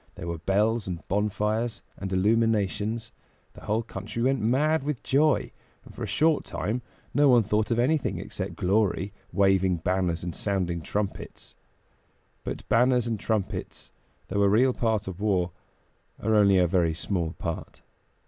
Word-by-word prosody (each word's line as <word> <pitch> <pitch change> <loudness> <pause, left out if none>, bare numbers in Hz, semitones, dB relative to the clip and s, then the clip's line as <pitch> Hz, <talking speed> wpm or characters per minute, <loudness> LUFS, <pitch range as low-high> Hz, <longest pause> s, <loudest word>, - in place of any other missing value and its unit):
There - - -7
were 85 -1 -3
bells 105 +5 +1
and 90 -2 -6
bonfires 105 +3 -1
and 95 -1 -6
illuminations; 110 +2 +1 0.4
the - - -13
whole 110 +2 0
country 110 +2 -5
went 135 +1 +2
mad 145 +8 +2
with 140 -2 -3
joy, 145 +1 +2 0.3
and - - -13
for - - -11
a - - -2
short 160 0 +2
time 110 +6 -3 0.3
no 145 +1 +5
one 120 -3 +6
thought 105 +1 0
of 115 - +1
anything 135 +5 +1
except - - -5
glory, 100 0 +1 0.2
waving 95 -2 +3
banners 85 0 -1
and 90 -1 -4
sounding 90 -4 -1
trumpets. 100 +4 -5 0.9
But - - -6
banners 125 +1 +3
and 115 -3 -2
trumpets, 110 -2 -3 0.4
though 100 +2 0
a 100 - +5
real 125 +5 +4
part 110 -5 0
of 95 +1 -6
war, 95 -4 +1 0.7
are 110 - 0
only 100 -2 +5
a 90 - +5
very 85 -2 +1
small 85 -2 -2
part. 85 -2 -6
105 Hz, 155 wpm, -27 LUFS, 95-115 Hz, 0.9 s, one